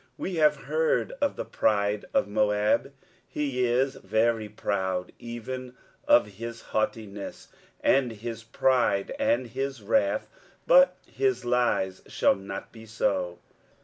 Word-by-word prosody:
23:016:006 -, -, -34 dB
We 185 Hz, -, -3 dB
have 155 Hz, -1 st, +5 dB
heard 485 Hz, +1 st, 0 dB
of 285 Hz, -, +1 dB
the -, -, -4 dB
pride 105 Hz, -1 st, +1 dB
of -, -, +2 dB
Moab; 105 Hz, +5 st, +1 dB, 0.4 s
he 135 Hz, -4 st, -1 dB
is 130 Hz, +3 st, +1 dB
very 110 Hz, -1 st, 0 dB
proud: 95 Hz, -3 st, -2 dB
even 125 Hz, +2 st, -7 dB, 0.3 s
of 120 Hz, -, +6 dB
his 115 Hz, +3 st, -8 dB
haughtiness, 105 Hz, -2 st, -3 dB, 0.3 s
and 130 Hz, -3 st, +3 dB
his 115 Hz, +1 st, -6 dB
pride, 115 Hz, -3 st, +1 dB
and 125 Hz, +2 st, +2 dB
his 130 Hz, 0 st, -4 dB
wrath: 100 Hz, -1 st, +1 dB, 0.4 s
but -, -, +6 dB
his 400 Hz, -1 st, -1 dB
lies 120 Hz, -6 st, +1 dB
shall -, -, +3 dB
not 95 Hz, 0 st, -7 dB
be 115 Hz, -1 st, -13 dB
so. 90 Hz, -5 st, -1 dB
115 Hz, 130 wpm, -27 LUFS, 105-130 Hz, 0.4 s, of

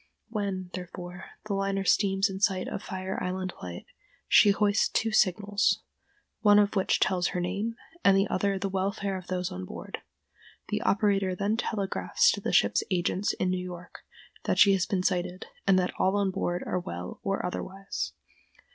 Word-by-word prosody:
When, 195 Hz, -4 st, -3 dB
therefore, 180 Hz, 0 st, -7 dB, 0.2 s
the 210 Hz, -, -2 dB
liner 195 Hz, 0 st, 0 dB
steams 195 Hz, 0 st, +3 dB
in 190 Hz, -1 st, -5 dB
sight 195 Hz, -2 st, +1 dB
of -, -, -4 dB
Fire 190 Hz, -2 st, -4 dB
Island 185 Hz, 0 st, -3 dB
Light 90 Hz, -1 st, -7 dB, 0.4 s
she 205 Hz, -, +7 dB
hoists 205 Hz, +1 st, +3 dB
two 225 Hz, -, 0 dB
signals, 205 Hz, 0 st, +2 dB, 0.6 s
one 205 Hz, -1 st, +6 dB
of 205 Hz, 0 st, +3 dB
which 190 Hz, -, +2 dB
tells 180 Hz, -2 st, +2 dB
her 180 Hz, -, -2 dB
name 200 Hz, +6 st, -2 dB, 0.3 s
and 195 Hz, -1 st, +6 dB
the 195 Hz, +1 st, +3 dB
other 195 Hz, +1 st, 0 dB
the 195 Hz, -, -2 dB
welfare 195 Hz, +1 st, -1 dB
of 185 Hz, -1 st, -7 dB
those 180 Hz, -1 st, -2 dB
on 90 Hz, -, -5 dB
board. 90 Hz, -, -7 dB, 0.7 s
The -, -, -1 dB
operator 195 Hz, -2 st, +2 dB
then 200 Hz, +4 st, 0 dB
telegraphs 225 Hz, -, +1 dB
to -, -, -4 dB
the -, -, -2 dB
ship's -, -, +4 dB
agents 185 Hz, +1 st, 0 dB
in 185 Hz, -, 0 dB
New 185 Hz, 0 st, -1 dB
York 180 Hz, -1 st, -9 dB, 0.5 s
that -, -, +1 dB
she 200 Hz, -, +7 dB
has 185 Hz, -1 st, +1 dB
been 185 Hz, -2 st, 0 dB
sighted, 180 Hz, 0 st, -1 dB, 0.2 s
and 195 Hz, -1 st, +6 dB
that 180 Hz, -1 st, +1 dB
all 190 Hz, +2 st, +3 dB
on 200 Hz, -2 st, +1 dB
board 175 Hz, -1 st, -2 dB
are -, -, -1 dB
well 90 Hz, -, -6 dB
or 195 Hz, -2 st, -1 dB
otherwise. 195 Hz, +2 st, -4 dB
190 Hz, 175 wpm, -28 LUFS, 180-200 Hz, 0.7 s, she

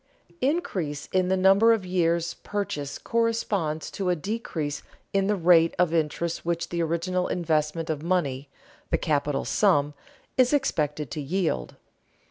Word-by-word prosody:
Increase 185 Hz, -, -1 dB
in 185 Hz, -1 st, +2 dB
the 190 Hz, +1 st, +2 dB
number 195 Hz, +5 st, +6 dB
of 210 Hz, -4 st, -1 dB
years' 170 Hz, -2 st, +1 dB
purchase 150 Hz, -9 st, -4 dB
corresponds 210 Hz, -9 st, -1 dB
to 190 Hz, -2 st, -2 dB
a 180 Hz, -, +3 dB
decrease 160 Hz, -6 st, -3 dB, 0.3 s
in 195 Hz, 0 st, +2 dB
the 210 Hz, -, +2 dB
rate 165 Hz, -2 st, +4 dB
of 175 Hz, -2 st, +2 dB
interest 165 Hz, +1 st, -1 dB
which 170 Hz, 0 st, -2 dB
the 170 Hz, -1 st, -2 dB
original 170 Hz, +3 st, 0 dB
investment 160 Hz, -1 st, 0 dB
of 155 Hz, -3 st, -2 dB
money, 145 Hz, -6 st, -1 dB, 0.4 s
the -, -, +2 dB
capital 145 Hz, -2 st, 0 dB
sum, 150 Hz, -8 st, +2 dB, 0.5 s
is 255 Hz, +2 st, +5 dB
expected 150 Hz, -, 0 dB
to 150 Hz, -, -3 dB
yield. 150 Hz, -, -1 dB
170 Hz, 140 wpm, -26 LUFS, 150-195 Hz, 0.5 s, number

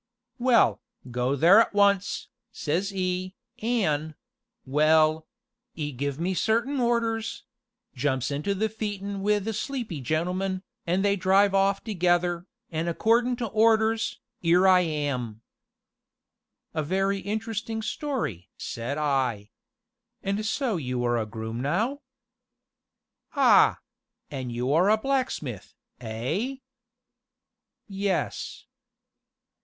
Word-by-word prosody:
'Well, 245 Hz, -1 st, +4 dB, 0.3 s
go 125 Hz, +3 st, 0 dB
there 175 Hz, -, +7 dB
at 220 Hz, -, -1 dB
once,' 200 Hz, -1 st, +2 dB, 0.2 s
says 185 Hz, 0 st, -1 dB
'e,' 185 Hz, -1 st, -2 dB, 0.3 s
an',' 160 Hz, -10 st, 0 dB, 0.5 s
well 155 Hz, +3 st, +3 dB, 0.5 s
'e 150 Hz, -2 st, -3 dB
give 140 Hz, +2 st, -3 dB
me 180 Hz, +3 st, 0 dB
certain 235 Hz, -, +1 dB
orders 230 Hz, -2 st, 0 dB, 0.5 s
jumps 130 Hz, -2 st, -1 dB
into 150 Hz, +8 st, -1 dB
the 215 Hz, +3 st, +1 dB
phaeton 205 Hz, -2 st, -4 dB
wi' 210 Hz, +1 st, +3 dB
the 215 Hz, +2 st, -3 dB
sleepy 220 Hz, -, -4 dB
gentleman, 180 Hz, +7 st, -1 dB, 0.2 s
an' 180 Hz, +3 st, +1 dB
they 200 Hz, 0 st, +3 dB
drive 195 Hz, +1 st, +3 dB
off 195 Hz, 0 st, +2 dB
together 175 Hz, -3 st, +1 dB, 0.2 s
an' 160 Hz, +1 st, -2 dB
accordin' 235 Hz, +8 st, +2 dB
to 240 Hz, -, -3 dB
orders 220 Hz, +1 st, +2 dB, 0.2 s
'ere 175 Hz, +3 st, +5 dB
I 185 Hz, -1 st, +7 dB
am." 140 Hz, -9 st, -2 dB, 1.3 s
"A 155 Hz, -, 0 dB
very 195 Hz, +5 st, 0 dB
interesting 220 Hz, +2 st, -3 dB
story!" 220 Hz, -, -3 dB
said 120 Hz, +5 st, -4 dB
I. 130 Hz, -8 st, 0 dB, 0.7 s
"And 200 Hz, +2 st, -1 dB
so 225 Hz, -1 st, 0 dB
you 125 Hz, -5 st, -2 dB
are 120 Hz, -1 st, +1 dB
a 110 Hz, -, -3 dB
groom 110 Hz, +1 st, -5 dB
now?" 220 Hz, -, 0 dB, 1.3 s
"Ah! -, -, +6 dB, 0.5 s
an' 130 Hz, -3 st, -4 dB
you 125 Hz, +3 st, -1 dB
are 175 Hz, +6 st, +4 dB
a 215 Hz, -, +5 dB
blacksmith, 235 Hz, -, -2 dB, 0.2 s
eh?" 125 Hz, -, -3 dB, 1.3 s
"Yes." 195 Hz, -1 st, -2 dB
185 Hz, 110 wpm, -26 LUFS, 145-215 Hz, 1.3 s, there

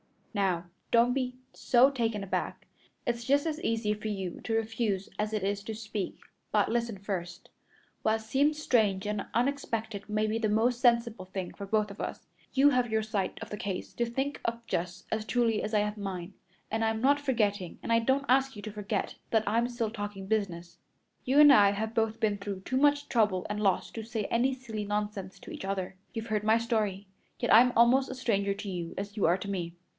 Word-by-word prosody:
"Now 185 Hz, -4 st, 0 dB, 0.2 s
don't 235 Hz, +1 st, +4 dB
be 250 Hz, -1 st, -1 dB, 0.2 s
so 255 Hz, +3 st, +4 dB
taken 225 Hz, -6 st, -1 dB
aback. 195 Hz, -, -3 dB, 0.4 s
It's 235 Hz, 0 st, -1 dB
just 280 Hz, +3 st, +3 dB
as 320 Hz, 0 st, -2 dB
easy 225 Hz, -2 st, 0 dB
for 210 Hz, +1 st, -6 dB
you 195 Hz, -4 st, -4 dB
to 225 Hz, -, 0 dB
refuse 220 Hz, -3 st, -1 dB
as 210 Hz, 0 st, 0 dB
it 215 Hz, -3 st, -1 dB
is 200 Hz, +1 st, -1 dB
to 220 Hz, -, -4 dB
speak, 215 Hz, -3 st, -4 dB, 0.3 s
but 210 Hz, -1 st, +3 dB
listen 235 Hz, -2 st, -1 dB
first. 185 Hz, -3 st, -5 dB, 0.5 s
What 220 Hz, 0 st, +1 dB
seems 280 Hz, +7 st, +1 dB
strange 210 Hz, -9 st, +2 dB
and 210 Hz, -1 st, -2 dB
unexpected 230 Hz, -5 st, -1 dB
may 215 Hz, +1 st, +1 dB
be 215 Hz, +1 st, 0 dB
the 220 Hz, -2 st, +1 dB
most 230 Hz, +3 st, +2 dB
sensible 235 Hz, -5 st, +2 dB
thing 185 Hz, -1 st, -5 dB
for 200 Hz, -, -7 dB
us 210 Hz, 0 st, +1 dB
both. -, -, -5 dB, 0.3 s
You 280 Hz, +2 st, +6 dB
have 250 Hz, -2 st, +2 dB
your 220 Hz, 0 st, +1 dB
side 210 Hz, -4 st, -2 dB
of -, -, -10 dB
the 210 Hz, -, -4 dB
case 195 Hz, -3 st, -4 dB
to 235 Hz, -, 0 dB
think 270 Hz, +4 st, -2 dB
of 235 Hz, 0 st, -2 dB
just 180 Hz, -1 st, -3 dB
as 220 Hz, -1 st, -1 dB
truly 225 Hz, 0 st, +1 dB
as 215 Hz, -, -4 dB
I 210 Hz, -, +4 dB
have 210 Hz, +1 st, -2 dB
mine; 195 Hz, -2 st, -5 dB, 0.4 s
and 220 Hz, +1 st, 0 dB
I'm 220 Hz, 0 st, 0 dB
not 285 Hz, +3 st, +4 dB
forgetting, 210 Hz, -, 0 dB
and -, -, -3 dB
I 230 Hz, -, +5 dB
don't 265 Hz, +4 st, +1 dB
ask 265 Hz, 0 st, +3 dB
you 205 Hz, -, -7 dB
to 215 Hz, -, -5 dB
forget, 210 Hz, -1 st, -3 dB
that 220 Hz, -1 st, +3 dB
I'm 235 Hz, +2 st, +2 dB
still 235 Hz, -3 st, -2 dB
talking 205 Hz, -3 st, -5 dB
business. 175 Hz, -5 st, -2 dB, 0.5 s
You 270 Hz, +3 st, +4 dB
and 290 Hz, -2 st, +9 dB
I 200 Hz, -5 st, +7 dB
have 220 Hz, +2 st, -3 dB
both 225 Hz, -1 st, 0 dB
been 210 Hz, -2 st, +1 dB
through 200 Hz, -1 st, -5 dB
too 260 Hz, +6 st, -2 dB
much 290 Hz, +1 st, +3 dB
trouble 210 Hz, -6 st, +2 dB
and 210 Hz, -, -2 dB
loss 195 Hz, -3 st, +1 dB
to 225 Hz, -, -5 dB
say 220 Hz, -1 st, -3 dB
any 255 Hz, +3 st, +2 dB
silly 225 Hz, -5 st, -5 dB
nonsense 205 Hz, -2 st, -3 dB
to -, -, -11 dB
each -, -, -6 dB
other. 190 Hz, -1 st, -3 dB, 0.2 s
You've 225 Hz, 0 st, -4 dB
heard 215 Hz, -1 st, 0 dB
my 220 Hz, +1 st, +5 dB
story, 215 Hz, -4 st, -1 dB, 0.3 s
yet -, -, +2 dB
I'm 240 Hz, +3 st, +7 dB
almost 255 Hz, +3 st, +5 dB
a 260 Hz, -, -5 dB
stranger 200 Hz, -6 st, 0 dB
to 205 Hz, 0 st, -6 dB
you 175 Hz, -3 st, -4 dB
as 200 Hz, +1 st, -5 dB
you 205 Hz, -, +2 dB
are 175 Hz, +3 st, +4 dB
to 200 Hz, -, -6 dB
me. 175 Hz, -3 st, -3 dB
220 Hz, 210 wpm, -30 LUFS, 200-235 Hz, 0.5 s, and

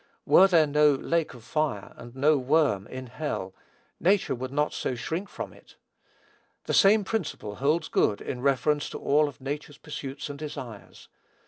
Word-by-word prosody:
Were 190 Hz, -, +7 dB
there 170 Hz, -5 st, +5 dB
no 150 Hz, 0 st, +4 dB
"lake 165 Hz, +1 st, -1 dB
of 120 Hz, -, -13 dB
fire," 145 Hz, -8 st, -2 dB
and 120 Hz, +1 st, -12 dB
no 150 Hz, +3 st, +4 dB
"worm" 135 Hz, -7 st, +2 dB
in 130 Hz, 0 st, -7 dB
hell, 120 Hz, -7 st, -4 dB, 0.5 s
nature 195 Hz, +3 st, +2 dB
would 130 Hz, +1 st, -5 dB
not 150 Hz, +2 st, 0 dB
so 130 Hz, -, -2 dB
shrink 165 Hz, +11 st, -4 dB
from -, -, -7 dB
it. -, -, -19 dB, 0.9 s
The -, -, -3 dB
same 205 Hz, +1 st, +6 dB
principle 180 Hz, -, -4 dB
holds 155 Hz, +4 st, +1 dB
good 100 Hz, -, +1 dB
in 125 Hz, -, -5 dB
reference 140 Hz, +2 st, +1 dB
to -, -, -6 dB
all 150 Hz, +1 st, +2 dB
of 145 Hz, -, -9 dB
nature's 145 Hz, +2 st, -5 dB
pursuits 140 Hz, -2 st, -6 dB
and 145 Hz, -1 st, -8 dB
desires. 125 Hz, -8 st, -8 dB
145 Hz, 165 wpm, -27 LUFS, 130-155 Hz, 0.9 s, Were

